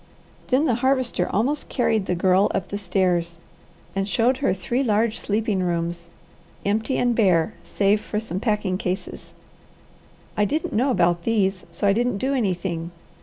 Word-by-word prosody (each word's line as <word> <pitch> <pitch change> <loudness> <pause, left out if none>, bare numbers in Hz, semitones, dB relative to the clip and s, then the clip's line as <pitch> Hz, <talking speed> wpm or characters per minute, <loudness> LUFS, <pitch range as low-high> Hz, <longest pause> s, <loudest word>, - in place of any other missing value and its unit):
Then 270 +4 +2
the 260 - +2
Harvester 255 -8 +1
almost 265 +9 0
carried 225 -6 +1
the 180 - 0
Girl 185 +2 +3
up 180 - -2
the 200 - -3
stairs 175 -3 0 0.6
and 195 +1 -1
showed 245 +5 +2
her 275 - +1
three 195 +8 -1
large 225 -2 +1
sleeping 210 -2 0
rooms, 170 -1 -2 0.6
empty 220 +6 0
and 245 -1 +2
bare 190 -4 +2
save 205 +1 +1
for 210 - -3
some 190 -4 -4
packing 210 -4 0
cases. 185 0 -5 1.0
"I 210 - +2
didn't 305 +10 -1
know 250 +6 +2
about 175 -8 +2
these, 195 -2 0
so 170 +4 -3
I 200 - +5
didn't 240 -1 0
do 265 +6 -1
anything. 180 -8 -1
205 Hz, 160 wpm, -23 LUFS, 180-235 Hz, 1.0 s, I